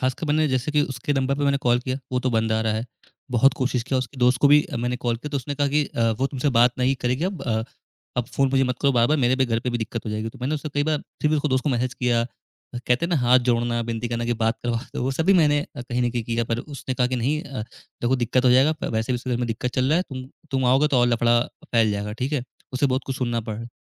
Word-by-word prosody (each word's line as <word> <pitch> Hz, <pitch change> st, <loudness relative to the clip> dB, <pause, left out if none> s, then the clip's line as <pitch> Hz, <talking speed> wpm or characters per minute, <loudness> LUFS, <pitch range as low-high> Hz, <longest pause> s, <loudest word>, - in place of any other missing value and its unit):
खासकर 130 Hz, +5 st, -1 dB
मैंने 155 Hz, +1 st, +2 dB
जैसे 130 Hz, +2 st, -1 dB
कि 150 Hz, -, +3 dB
उसके 125 Hz, +3 st, -2 dB
नंबर 135 Hz, -1 st, +1 dB
पे 145 Hz, -, 0 dB
मैंने 140 Hz, 0 st, +3 dB
कॉल 120 Hz, 0 st, +4 dB
किया, 130 Hz, +1 st, -3 dB
वो 125 Hz, -, +1 dB
तो 130 Hz, -, 0 dB
बंद 110 Hz, -1 st, +1 dB
आ 110 Hz, -, +1 dB
रहा 110 Hz, -1 st, 0 dB
है। 110 Hz, +2 st, -2 dB, 0.5 s
बहुत 125 Hz, +3 st, +4 dB
कोशिश 130 Hz, -3 st, -1 dB
किया, 130 Hz, +2 st, -1 dB
उसके 130 Hz, +1 st, -5 dB
दोस्त 125 Hz, 0 st, +3 dB
को 145 Hz, -, +6 dB
भी 145 Hz, +1 st, +6 dB
मैंने 120 Hz, +1 st, -1 dB
कॉल 120 Hz, -1 st, +1 dB
किया 135 Hz, +6 st, -7 dB
तो 145 Hz, -, -1 dB
उसने 140 Hz, +2 st, -4 dB
कहा 145 Hz, 0 st, +1 dB
कि 150 Hz, +1 st, +2 dB
अ, 115 Hz, -4 st, 0 dB
वो 135 Hz, -, +2 dB
तुमसे 135 Hz, +1 st, -1 dB
बात 120 Hz, +1 st, +5 dB
नहीं 130 Hz, +2 st, +2 dB
करेगी 125 Hz, +6 st, +1 dB
अब 190 Hz, -1 st, -3 dB
अ, 110 Hz, -3 st, 0 dB, 0.5 s
अब 125 Hz, -, +1 dB
फ़ोन 135 Hz, -1 st, +1 dB
मुझे 135 Hz, 0 st, +3 dB
मत 125 Hz, 0 st, -2 dB
करो 140 Hz, -1 st, +3 dB
बार-बार, 125 Hz, +5 st, +3 dB
मेरे 130 Hz, -1 st, +3 dB
भी 130 Hz, -, +3 dB
घर 115 Hz, -1 st, 0 dB
पे 125 Hz, -, -2 dB
भी 120 Hz, -, -1 dB
दिक्कत 115 Hz, 0 st, -4 dB
हो -, -, -2 dB
जाएगी, 110 Hz, +1 st, -3 dB
तो -, -, -13 dB
मैंने 135 Hz, +5 st, -1 dB
उसे 155 Hz, 0 st, -4 dB
कई 145 Hz, -, +2 dB
बार 155 Hz, -1 st, +1 dB, 0.2 s
फिर 150 Hz, -, +3 dB
भी 155 Hz, -, +3 dB
उसके 150 Hz, +1 st, 0 dB
दोस्त 130 Hz, -1 st, 0 dB
को -, -, +1 dB
मैसेज 125 Hz, 0 st, -1 dB
किया, 120 Hz, -2 st, +1 dB, 0.5 s
कहते 125 Hz, +4 st, 0 dB
हैं -, -, -1 dB
ना 170 Hz, -, +3 dB
हाथ 125 Hz, +1 st, +5 dB
जोड़ना, 120 Hz, 0 st, +1 dB
विनती 115 Hz, 0 st, -3 dB
करना 120 Hz, 0 st, -2 dB
कि 120 Hz, -, 0 dB
बात 115 Hz, +1 st, +1 dB
करवा 120 Hz, -1 st, 0 dB, 0.2 s
दो। -, -, -2 dB
वो 130 Hz, -, 0 dB
सब 160 Hz, +4 st, -1 dB
भी 195 Hz, -, +6 dB
मैंने 150 Hz, -4 st, +4 dB, 0.2 s
कहीं 125 Hz, 0 st, -2 dB
न 120 Hz, -, +1 dB
कहीं 120 Hz, -1 st, -2 dB
किया, 115 Hz, 0 st, -1 dB
पर 115 Hz, +1 st, -2 dB
उसने 140 Hz, -2 st, -6 dB
कहा 125 Hz, 0 st, +2 dB
कि 125 Hz, +1 st, -2 dB
नहीं 140 Hz, +6 st, 0 dB
अ, 135 Hz, -6 st, -6 dB, 0.4 s
देखो 125 Hz, +2 st, +2 dB
दिक्कत 125 Hz, +1 st, +1 dB
हो 125 Hz, -, +6 dB
जाएगा, 135 Hz, +5 st, +5 dB, 0.2 s
वैसे 110 Hz, +2 st, -1 dB
भी -, -, 0 dB
उसके 125 Hz, +1 st, -5 dB
घर 120 Hz, -, +1 dB
में 120 Hz, 0 st, -1 dB
दिक्कत 115 Hz, +2 st, -2 dB
चल 130 Hz, -1 st, +1 dB
रहा 155 Hz, -, +3 dB
है। -, -, +1 dB
तुम 130 Hz, -1 st, -6 dB, 0.2 s
तुम 135 Hz, -2 st, 0 dB
आओगे 135 Hz, +4 st, +4 dB
तो 135 Hz, -, +2 dB
और 120 Hz, -, +4 dB
लफड़ा 120 Hz, 0 st, +3 dB, 0.3 s
फैल 115 Hz, -2 st, +4 dB
जाएगा, 105 Hz, +1 st, -3 dB
ठीक 130 Hz, +6 st, -3 dB
है? 135 Hz, -5 st, -1 dB, 0.3 s
उसे 130 Hz, +2 st, +2 dB
बहुत 130 Hz, 0 st, -1 dB
कुछ 135 Hz, -, -3 dB
सुनना 120 Hz, -2 st, -1 dB
पड़ 110 Hz, -1 st, -5 dB
रहा 110 Hz, -, -6 dB
है। 115 Hz, -, -8 dB
125 Hz, 300 wpm, -23 LUFS, 120-135 Hz, 0.5 s, को